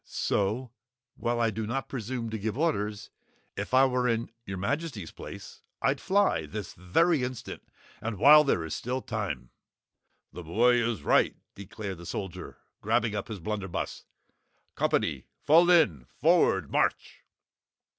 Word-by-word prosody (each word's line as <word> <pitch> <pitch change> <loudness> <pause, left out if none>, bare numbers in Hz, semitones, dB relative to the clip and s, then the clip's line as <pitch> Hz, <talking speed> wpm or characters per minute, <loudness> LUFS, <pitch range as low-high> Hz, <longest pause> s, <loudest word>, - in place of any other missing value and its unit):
So 110 +5 -1 0.4
while 120 0 -1
I 115 -1 +2
do 110 0 -4
not 135 +4 -2
presume 115 -2 -4
to 110 - -3
give 110 +3 -3
orders 105 -10 -1 0.4
if - - -5
I 130 +1 +6
were 125 -1 +1
in 115 0 -1 0.2
your 95 0 -4
Majesty's 125 - -3
place, - - -10 0.2
I'd - - 0
fly, 190 - +2
this 100 +7 -6
very 145 - +2
instant 125 -1 -5 0.4
and 110 -2 -3
while 150 +8 +8
there 85 - 0
still 125 - -2
is 130 - -7
time!" 100 - -4 0.8
"The - - -7
boy 115 +9 +3
is 115 -2 -2
right," - - +3 0.2
declared 100 -2 -7
the 85 - -9
Soldier, 95 -2 -6 0.2
grabbing 110 -1 +1
up 105 - -3
his 110 -3 -6
blunder 100 +2 -3
buss. 85 - -5 0.7
"Company! - - 0 0.2
Fall 165 +4 +6
in! 95 - +4
Forward - - +3
march!" - - 0
115 Hz, 145 wpm, -28 LUFS, 100-130 Hz, 0.8 s, while